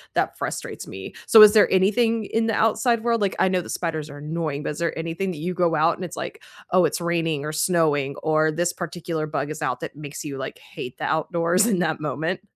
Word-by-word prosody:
that - - 0
frustrates - - -5
me. 95 0 -8
So, 220 - +9
is 210 0 +8
there 215 - +5
anything 215 +4 +2
in 225 +2 0
the 225 - +1
outside 230 +1 +2
world 230 -2 +1
like, 200 - 0
I - - +4
know 185 -1 +1
that - - -11
spiders 160 -3 -3
are 145 - -9
annoying, 150 -1 -3
but - - -2
is 150 - -7
there 170 -1 -1
anything 165 +4 -3
that 175 - -7
you 175 +4 -3
go 175 -2 +1
out 160 +2 +3
and 185 - -8
it's 175 - -7
like, - - -6 0.3
"Oh, 185 0 +5
it's - - -1
raining 165 -4 -1
or 155 - -4
snowing," 150 -4 +1
or 155 0 +2
this 175 +3 0
particular 170 -2 -4
bug 150 -2 -3
is 155 +1 -7
out 125 -4 -1
that - - -6
makes 145 0 -8
you, 140 -2 -5
like, 130 - -6
hate 125 - -9
the - - -6
outdoors 170 +4 +1
in 200 -6 +1
that 160 -3 0
moment? 155 +5 -2
165 Hz, 240 wpm, -23 LUFS, 155-185 Hz, 0.3 s, So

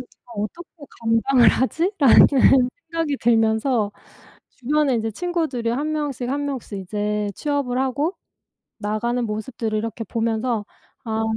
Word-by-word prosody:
내가 245 -1 -15
어떻게 315 +5 -8
감당을 230 +1 +4
하지?'라는 270 - +4 0.2
생각이 325 -4 -1
들면서 225 -1 +2 0.6
주변에 280 +1 0
인제 225 -1 -1
친구들이 315 - -2
1 290 +6 -1
명씩 285 -5 -3
1 285 +2 -1
명씩 250 -7 -5
이제 210 +2 -2
취업을 285 -4 -1
하고 280 +7 0 0.6
나가는 235 +3 -1
모습들을 220 0 -3
이렇게 225 +1 -4
보면서 225 0 -1 0.4
'아 220 -1 -1
245 Hz, 275 characters per minute, -22 LUFS, 220-285 Hz, 0.6 s, 감당을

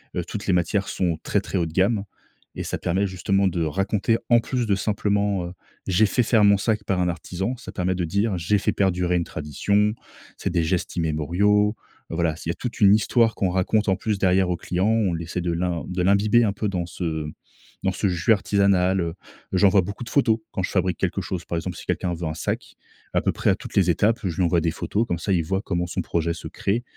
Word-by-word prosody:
Heu, 90 - -1
toutes 100 +4 -6
les 95 - +3
matières 90 +3 +1
sont 85 -3 -1
très, 100 - 0
très 100 - -3
haut 85 - +1
de 80 - -7
gamme 100 +3 +2 0.5
et - - -3
ça - - -3
permet 95 +4 0
justement 95 +1 +1
de 85 -2 -2
raconter, 95 +7 0
en 120 -1 +6
plus 125 +1 -2
de 100 - +3
simplement, 100 -2 0
heu: - - -7 0.4
«J'ai 95 +4 +4
fait 120 +4 +1
faire 110 -2 +4
mon 100 0 +6
sac 105 +1 -1
par 95 -2 0
un 90 - +1
artisan», 90 +8 -3
ça 120 - -10
permet 90 0 0
de 90 -1 -1
dire: 100 +4 0
«J'ai 85 +5 +1
fait 100 - 0
perdurer 90 -2 +1
une 85 - -1
tradition, 100 +9 0 0.4
c'est - - -2
des 85 -1 +1
gestes 85 +2 -1
immémoriaux». 90 +7 +2 0.4
Heu - - -3
voilà, 80 -1 +1
c'est - - -10
il - - -3
y - - +3
a - - -2
toute 125 +4 -6
une 100 -1 +7
histoire 115 +1 +2
qu'on 95 - 0
raconte 95 +4 +1
en 95 - +3
plus 105 0 -2
derrière 95 0 +3
aux - - +1
clients, 90 +3 -1
on 110 -6 +2
essaie 85 +2 -4
de 85 0 -1
l'im 85 0 -1
de 90 0 -2
l'imbiber 105 +5 +4
un 105 -3 +1
peu 105 +1 -2
dans 90 -3 -2
ce 80 -3 -3 0.6
dans 95 - +2
ce 95 +2 -1
jus 90 +3 +1
artisanal, 100 -2 +2
heu, 85 -1 -2 0.4
j'envoie 95 +1 +5
beaucoup 100 +6 -6
de 120 - -8
photos 120 -6 +3
quand 95 - -2
je - - -1
fabrique 90 -3 0
quelque - - -1
chose. 85 -2 -5
Par 85 - -4
exemple, 80 - -4
si - - -10
quelqu'un 90 -2 -1
veut 85 0 -5
un 80 - -3
sac 80 - -4 0.4
à - - +2
peu - - +1
près - - 0
à - - +4
toutes - - -10
les 90 -3 +4
étapes, 105 +7 +2
je 90 -4 -2
lui 95 - +2
envoie 85 -1 +2
des 80 0 0
photos 105 +7 -1
comme 85 - -1
ça, 100 +3 -1
il 85 -3 +2
voit 95 +5 -1
comment 90 -1 -1
son - - -2
projet 85 0 -1
se - - -8
crée 110 +5 -2
95 Hz, 245 wpm, -24 LUFS, 85-105 Hz, 0.6 s, une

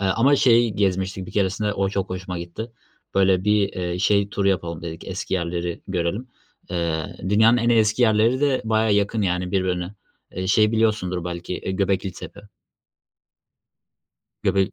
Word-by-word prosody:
eee, 95 - 0
ama 125 +9 +3
şey 120 -3 +4
gezmiştik 95 -1 -1
bir - - -10
keresinde 105 +1 0
o 100 -1 0
çok 95 -1 -3
hoşuma 90 -1 -5
gitti. 85 +7 -7 0.4
Böyle, 95 -1 +3
bir, 105 -1 +3
eee, 90 -1 -3
şey 100 +1 +2
turu 100 -1 0
yapalım 85 -3 -2
dedik 80 -1 -7
eski 95 0 -3
yerleri 85 -1 -3
görelim. 95 +7 -2 0.4
Eee, 85 -3 -2
dünyanın 110 +4 +5
en 120 0 +1
eski 110 0 +3
yerleri 115 +3 +3
de 140 -3 +1
bayağı 110 -1 +2
yakın, 105 +2 +1
yani, 90 -1 -1
birbirine. 90 0 -1 0.4
Eee, 95 +1 -4
şey 105 +3 +3
biliyorsundur 105 -6 0
belki, 90 +1 -5
eee, - - -5
Göbeklitepe. 95 0 -2 2.0
Göbek 95 0 +1
95 Hz, 150 wpm, -23 LUFS, 90-110 Hz, 2.0 s, dünyanın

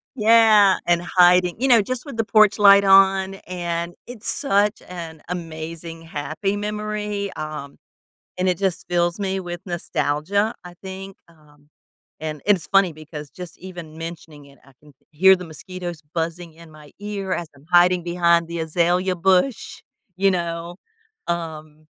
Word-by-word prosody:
yeah 215 -4 +6
and 175 0 +3
hiding, 180 0 +4
you 270 - +2
know, 235 -3 +7
just 255 +6 -5
with 280 -6 -8
the 225 - 0
porch 215 -1 +4
light 200 -1 +7
on, 195 0 +5
and 170 -1 -3
it's 235 -3 -9
such 210 -8 +1
an 165 -3 -8
amazing, 165 -1 -7
happy 165 +6 -3
memory, 210 -1 -3
um, 150 -2 -7 0.6
and 185 +1 0
it 180 - 0
just 190 -3 -1
fills 175 +1 0
me 195 -1 -1
with 175 -2 -6
nostalgia. 175 +4 -1
I 175 0 -11
think, 190 0 -8
um 150 -3 -24 0.5
and 155 -2 -5
it's 195 -5 +2
funny 195 -3 +3
because 150 -1 -10
just 180 -2 -10
even 175 -4 -10
mentioning 165 -3 -9
it, 140 0 -19
I 135 - -21
can 150 -1 -19 0.2
hear 190 +5 +6
the 180 -1 -8
mosquitoes 175 +1 -8
buzzing 165 0 -3
in 165 0 -16
my 150 -1 -15
ear 200 -2 -5
as 175 - -4
I'm 140 +1 -20
hiding 175 0 +5
behind 170 -1 +2
the 170 0 -5
azalea 175 +3 +1
bush, 190 +7 +1 0.4
you 195 +1 +3
know? 170 -1 -4 0.5
Um, 155 -2 -5
175 Hz, 155 wpm, -22 LUFS, 165-195 Hz, 0.6 s, know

